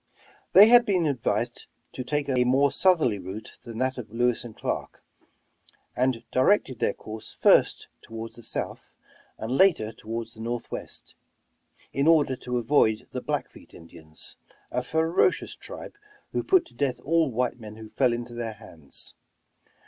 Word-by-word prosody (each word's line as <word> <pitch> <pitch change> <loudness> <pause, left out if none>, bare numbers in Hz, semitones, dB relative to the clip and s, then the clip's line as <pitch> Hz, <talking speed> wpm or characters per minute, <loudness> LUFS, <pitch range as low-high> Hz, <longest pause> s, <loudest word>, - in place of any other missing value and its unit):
They 205 +3 +10
had 240 +1 +8
been 185 -6 +1
advised 120 -4 -1 0.2
to 130 - -5
take 145 +3 -1
a 130 -2 +2
more 135 +3 +3
southerly 160 - +3
route 95 +4 -8
than 115 -2 -9
that 130 +1 -1
of 110 -4 -8
Lewis 120 +1 +1
and 115 -3 -10
Clark, - - -4 0.9
and 125 -2 +1
directed 130 - +2
their - - +1
course 110 0 -8
first - - +3
toward 115 0 -8
the 120 - -12
south, 115 - -5 0.4
and 110 +2 -5
later 160 - +4
toward 115 +1 -6
the 115 - -15
northwest, 120 +1 -5 0.8
in 140 +3 +1
order 150 -5 +4
to 125 0 -3
avoid 115 -3 +2
the - - -4
Blackfeet - - -5
Indians, 80 -2 -5 0.3
a 125 - 0
ferocious 160 - +1
tribe, - - -9 0.4
who - - 0
put 370 -3 +4
to - - -19
death 130 -4 -1
all 160 +1 +2
white 125 +1 -1
men 105 -2 -9
who 110 0 -10
fell 125 +3 +2
into 120 0 -4
their 120 -2 -4
hands. 85 -9 -8
125 Hz, 155 wpm, -26 LUFS, 110-145 Hz, 0.9 s, They